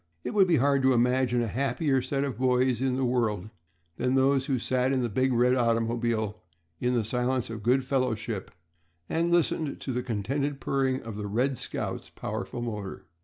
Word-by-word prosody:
It - - -4
would 195 -3 +5
be 175 - +4
hard 140 0 +3
to 130 0 +4
imagine 125 0 +2
a - - -1
happier 135 +3 0
set 135 +2 -1
of 135 -3 -3
boys 125 -1 +2
in 130 -1 +1
the 130 0 0
world 110 -5 0 0.5
than 125 +1 +1
those 135 0 +3
who 135 - +1
sat 130 +2 +1
in 130 -2 +1
the 120 - -1
big 130 +5 +1
red 125 +1 +3
automobile 115 -2 0 0.4
in 125 0 +1
the 115 - +2
silence 125 +2 -1
of 110 -2 -6
good 125 +5 +2
fellowship 120 -6 -1 0.6
and 170 +1 0
listened 160 -3 +1
to 135 - -3
the 125 - -1
contented 135 +5 -2
purring 135 -1 0
of 115 -2 -7
the 105 -1 -4
"Red 125 +5 0
Scout's" - - -4
powerful 120 - -5
motor. 105 -5 -5
125 Hz, 185 wpm, -28 LUFS, 115-135 Hz, 0.6 s, would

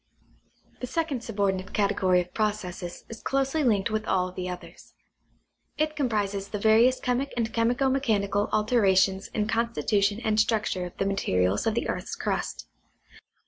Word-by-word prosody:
The 250 - -4
second 300 -5 -2
subordinate 195 -4 -1
category 195 -3 +2
of 180 0 -10
processes 200 -5 -3
is 225 - -9
closely 275 +3 0
linked 215 -4 +2
with 215 0 -2
all 185 -1 +1
of 180 - -15
the 180 0 -4
others. 180 0 -10 0.8
It 310 0 0
comprises 205 -8 -1
the 210 - -4
various 225 +5 +4
chemic 255 +2 -1
and 225 -1 -1
chemico 240 +4 +2
mechanical 205 -6 +1
alterations 195 -3 +3
in 210 -1 -2
constitution 215 -2 +1
and 215 -1 +1
structure 215 -5 +1
of 175 - -14
the 195 - 0
materials 95 - +1
of 220 - +1
the 235 - -1
earth's - - -3
crust. - - -3
215 Hz, 150 wpm, -27 LUFS, 195-235 Hz, 0.8 s, various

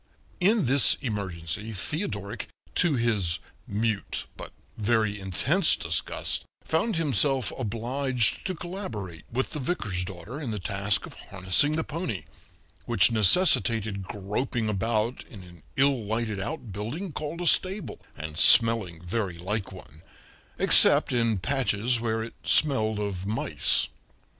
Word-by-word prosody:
In 200 0 +3
this 135 +1 +5
emergency 100 - -4
Theodoric, 105 - -4 0.3
to 170 -5 +2
his 105 -8 0 0.3
mute 105 0 -2
but - - -8 0.2
very 110 -1 0
intense 135 - +2
disgust, 80 -1 -2 0.2
found 170 +7 0
himself 140 -5 +2
obliged 125 +2 0
to 185 - -2
collaborate 120 - -7
with 130 +3 -1
the 150 - -4
vicar's 110 - -2
daughter 95 - -8
in 135 - -4
the 110 - -3
task 100 +2 0
of - - -12
harnessing 95 +11 +1
the 160 - -1
pony, 155 - -4 0.6
which 115 -2 +4
necessitated 110 - +3
groping 105 +4 -3
about 110 +3 -1
in 100 -6 -11
an 90 -2 -15
ill 135 -3 +2
lighted 110 -1 -2
outbuilding 120 - -5
called 155 +3 -5
a - - -3
stable, 190 +4 +2 0.2
and 75 +1 -1 0.2
melling 110 -8 -4
very 90 -1 -3
like 95 +4 -4
one 80 -5 -13 0.6
except - - +5
in 115 -3 +2
patches 120 0 0
where 110 -1 -1
it 115 - -8
smelled 110 -8 +2
of 100 -2 -4
mice. 110 +2 +1
110 Hz, 130 wpm, -26 LUFS, 100-135 Hz, 0.6 s, this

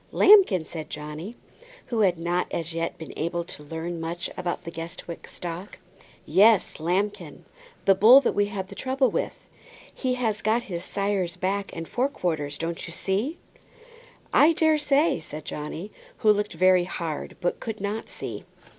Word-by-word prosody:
"Lambkin," 380 - +6
said 155 -2 -7
Johnny, 150 +8 -6 0.5
who 235 -3 -2
had 185 -5 +3
not 175 +2 -1
as 165 0 -3
yet 165 0 -2
been 160 - -9
able 170 +2 -2
to 160 - -9
learn 165 +3 -5
much 170 +1 -4
about 180 -1 -3
the 170 - -6
Guestwick 165 +1 -7
stock. 175 +3 -7 0.5
"Yes, 200 +4 +4
Lambkin. 180 -2 -2 0.4
The 195 - +7
bull 220 +8 +8
that 250 - +1
we 205 0 +2
had 195 -2 -5
the - - -8
trouble 260 0 +1
with. - - -3 0.5
He 255 -2 -1
has 225 -4 0
just - - -11
got 225 +3 +2
his 175 -4 -5
sire's 195 -3 -1
back 195 +2 -1
and 165 -1 -5
fore 255 +3 0
quarters. 155 - -2
Don't 165 0 -4
you - - -7
see?" 200 - -1 1.0
"I 315 +3 +6
daresay," 310 - +3
said 155 -1 -8
Johnny, 155 +7 -6 0.3
who 215 - +5
looked 210 0 0
very 185 -1 +4
hard, 165 -4 -5
but 175 -1 -1
could 220 -1 -5
not 205 +3 -3
see. - - -6
185 Hz, 165 wpm, -26 LUFS, 165-215 Hz, 1.0 s, bull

